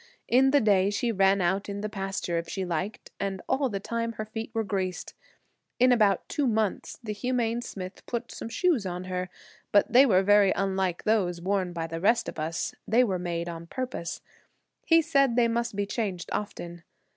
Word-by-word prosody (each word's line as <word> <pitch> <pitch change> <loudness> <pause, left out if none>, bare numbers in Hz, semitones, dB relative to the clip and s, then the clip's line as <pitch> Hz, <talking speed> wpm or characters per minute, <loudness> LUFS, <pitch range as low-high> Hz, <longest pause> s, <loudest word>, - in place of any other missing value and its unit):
In 260 +3 +5
the 285 +1 +5
day 200 -3 +4
she 230 +3 0
ran 195 -1 +3
out 190 +4 0
in 200 0 -4
the 215 - -2
pasture 195 -4 -2
if 165 - -7
she 190 -1 -3
liked, 185 +6 -4
and 195 -1 -2
all 270 -1 +1
the 200 -3 -3
time 230 +3 -3
her 215 0 -5
feet 220 +1 -6
were 225 -1 -1
greased. 185 -2 -3 0.6
In 255 +1 +5
about 210 -6 +3
two 290 -3 0
months 220 -3 -1
the 215 -2 -3
humane 235 +1 -1
smith 185 -5 -8
put 240 0 -4
some - - -7
shoes 295 - +1
on 180 0 -4
her, 185 0 -3 0.4
but 205 - +3
they 265 +3 +8
were 190 -4 +4
very 205 -1 +5
unlike 190 -2 -1
those 190 -6 +1
worn 185 0 -1
by 165 -1 -3
the 165 0 -5
rest 235 +4 +3
of - - -6
us; 160 +2 -2
they 235 +3 +4
were 190 -6 -1
made 170 -1 -3
on 170 -1 -7
purpose. 250 -8 -4 0.7
He 330 0 +6
said 275 -5 +3
they 240 -1 +4
must 235 -1 -1
be 205 0 0
changed 200 -4 -3
often. 175 -4 -5
200 Hz, 195 wpm, -27 LUFS, 185-230 Hz, 0.7 s, they